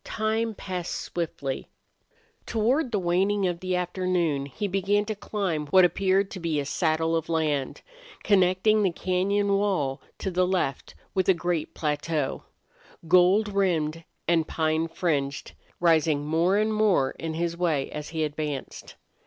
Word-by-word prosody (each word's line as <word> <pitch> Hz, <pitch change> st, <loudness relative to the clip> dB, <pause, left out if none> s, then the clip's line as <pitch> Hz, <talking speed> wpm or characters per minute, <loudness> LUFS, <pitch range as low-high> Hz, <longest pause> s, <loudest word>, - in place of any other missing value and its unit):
Time 220 Hz, 0 st, -1 dB
passed 180 Hz, -3 st, -4 dB
swiftly. 150 Hz, -6 st, -4 dB, 0.8 s
Toward 240 Hz, +5 st, +1 dB
the 215 Hz, -, +1 dB
waning 190 Hz, +3 st, +1 dB
of 175 Hz, -2 st, -1 dB
the 185 Hz, 0 st, -2 dB
afternoon 180 Hz, -5 st, 0 dB
he 205 Hz, +9 st, -4 dB
began 195 Hz, +2 st, +1 dB
to 215 Hz, -, -2 dB
climb 190 Hz, -7 st, -3 dB
what 185 Hz, +4 st, +6 dB
appeared 195 Hz, +2 st, +1 dB
to 190 Hz, -, -6 dB
be 165 Hz, -3 st, -1 dB
a 140 Hz, -, -2 dB
saddle 160 Hz, +2 st, 0 dB
of 165 Hz, 0 st, -2 dB
land, 150 Hz, -4 st, -1 dB, 0.4 s
connecting 195 Hz, +2 st, +3 dB
the 190 Hz, -3 st, +2 dB
cañon 195 Hz, +3 st, +1 dB
wall 150 Hz, -10 st, 0 dB, 0.2 s
on 190 Hz, -, -1 dB
the 180 Hz, +1 st, +2 dB
left 175 Hz, -8 st, -2 dB, 0.2 s
with 190 Hz, -1 st, +1 dB
a 190 Hz, -, +6 dB
great 170 Hz, -1 st, -2 dB
plateau, 150 Hz, -1 st, -1 dB, 0.7 s
gold 185 Hz, +5 st, +5 dB
rimmed 165 Hz, -5 st, 0 dB, 0.2 s
and 165 Hz, -2 st, +2 dB
pine 160 Hz, 0 st, 0 dB
fringed, 145 Hz, -6 st, -2 dB, 0.3 s
rising 160 Hz, -3 st, +3 dB
more 165 Hz, +5 st, +2 dB
and 215 Hz, +1 st, +1 dB
more 205 Hz, -11 st, +2 dB
in 160 Hz, -1 st, -5 dB
his 170 Hz, 0 st, -1 dB
way 165 Hz, -6 st, 0 dB
as 150 Hz, 0 st, -6 dB
he 160 Hz, -1 st, -2 dB
advanced. 150 Hz, -2 st, -5 dB
175 Hz, 145 wpm, -26 LUFS, 155-195 Hz, 0.8 s, what